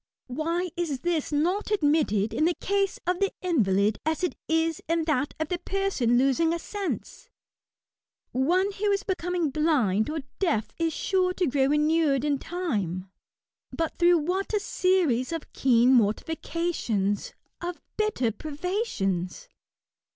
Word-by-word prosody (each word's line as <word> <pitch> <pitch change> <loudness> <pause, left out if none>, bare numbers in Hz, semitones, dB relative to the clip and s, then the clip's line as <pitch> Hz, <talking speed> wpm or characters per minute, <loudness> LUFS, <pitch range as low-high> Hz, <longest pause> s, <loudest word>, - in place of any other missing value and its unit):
Why 330 +7 -2
is 315 -7 -2
this 340 -4 -1
not 350 +9 0
admitted 290 - +2
in 310 - +2
the 345 0 +2
case 395 0 0
of 360 0 0
the 395 - +1
invalid 210 - +2
as 320 +3 -1
it 360 - +1
is 325 0 +1
in 330 0 +2
that 295 -3 0
of 315 -1 -2
the 355 - -1
person 370 -12 +1
losing 275 +6 +3
a - - -1
sense? 410 +6 -5 1.0
One 355 +10 +2
who 410 +1 -1
is 400 0 0
becoming 355 -4 -1
blind 265 - +2
or 310 0 -2 0.2
deaf 305 - 0
is 330 -1 +1
sure 365 +2 +1
to 365 - 0
grow 270 -1 +2
inured 300 -2 +2
in 285 -2 +1
time; 205 - -3 0.6
but 325 -1 -3
through 350 0 +6
wha;t 370 +7 -1
a - - 0
series 350 -11 +1
of 330 -2 -5
keen 250 -1 +4
mortifications, 230 - 0 0.3
of 350 0 -4 0.2
bitter 425 - 0
privations 285 - -3
320 Hz, 140 wpm, -27 LUFS, 255-360 Hz, 1.0 s, through